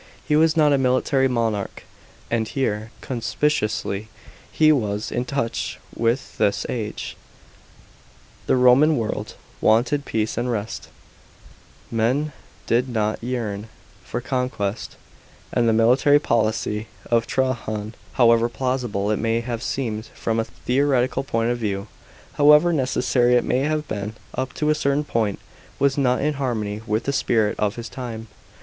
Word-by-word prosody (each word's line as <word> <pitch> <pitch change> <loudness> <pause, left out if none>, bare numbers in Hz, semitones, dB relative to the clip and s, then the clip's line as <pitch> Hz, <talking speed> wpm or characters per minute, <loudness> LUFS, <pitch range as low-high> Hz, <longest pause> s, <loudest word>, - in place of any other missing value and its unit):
He 150 - +3
was 160 +1 +4
not 150 -2 +5
a 140 - +3
military 130 +1 +2
monarch; 115 -5 -2 0.5
and 115 -1 +1
here, 110 -5 -2
conspicuously, 115 -5 -1 0.4
he 155 -1 +5
was 105 -7 -1
in 125 - -1
touch 120 -3 -2 0.2
with 115 +3 -1
his 105 -2 +1
age. 110 -4 -4 1.3
The - - +4
Roman 130 +5 +5
world 110 -2 -3 0.3
wanted 130 +6 +3
peace 110 +1 -1
and 125 +1 -1
rest; 110 -2 -4 1.0
men 125 +7 0 0.3
did 125 +3 +1
not 110 -2 -1
yearn 115 -4 -3 0.4
for 120 - -4
conquest; 125 -5 -2 0.6
and 120 -2 +3
the - - +4
military 125 +6 +5
policy 110 -4 0 0.2
of 115 0 +3
Trajan, 110 -4 -1 0.2
however 115 -1 +4
plausible 120 -5 -1
it 105 - 0
may 115 +1 +1
have 120 -1 -4
seemed 115 -4 -3
from 115 0 -1
a 110 - 0
theoretical 130 +1 0
point 115 -2 0
of 120 - -2
view, 100 -3 -2 0.6
however 150 +4 +7
necessary 125 -3 +2
it 120 - +3
may 125 - +1
have 150 +2 -1
been 105 +1 -4 0.2
up 130 0 -3
to 150 0 +1
a - - +5
certain 140 -1 0
point, 110 -8 -1 0.4
was 140 0 +2
not 130 -3 +2
in 150 +1 +1
harmony 110 -5 -2
with 110 +2 0
the 140 - -1
spirit 110 -5 +1
of 105 -1 0
his 120 0 -6
time. 115 -3 -7
120 Hz, 145 wpm, -23 LUFS, 110-135 Hz, 1.3 s, however